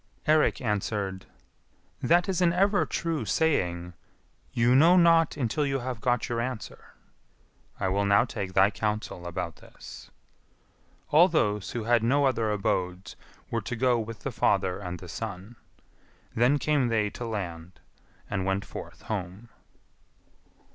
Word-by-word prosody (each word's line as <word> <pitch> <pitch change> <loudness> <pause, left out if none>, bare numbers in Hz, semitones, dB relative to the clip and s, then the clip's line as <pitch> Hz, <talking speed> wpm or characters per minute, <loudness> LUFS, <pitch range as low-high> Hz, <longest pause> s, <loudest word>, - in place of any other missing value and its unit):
Eirik 155 0 +3
answered, 100 -4 -2 0.7
"That 175 +2 +3
is 185 -2 -1
an 170 -1 +4
ever 200 +3 +2
true 165 -2 -2
saying, 90 - 0 0.6
'You 120 +1 +3
know 165 +7 +6
not 165 -3 +4
until 135 +2 0
you 135 -1 0
have 125 -3 -5
got 120 -2 +1
your 115 -1 -1
answer.' 125 -3 -7 0.8
I 95 - 0
will 100 +2 0
now 100 +3 +4
take 100 -6 -5
thy 95 +2 +5
counsel 105 -2 -3
about 85 -1 -4
this." - - -13 1.0
All 165 +5 +7
those 105 - 0
who 120 - -3
had 120 +1 +3
no 140 +5 +2
other 115 -5 +1
abodes 95 -3 -2 0.4
were - - -1
to 125 - -5
go 125 0 +2
with 115 0 -6
the 135 - -4
father 95 -4 +1
and 90 -3 -5
the 90 - -11
son. 100 +3 -7 0.8
Then 125 +5 +3
came 145 -3 +1
they 110 -3 0
to 120 - -6
land, 90 -5 -6 0.5
and 95 -2 -2
went 95 +1 -1
forth - - -9
home. 100 +2 -5
110 Hz, 145 wpm, -27 LUFS, 95-135 Hz, 1.0 s, All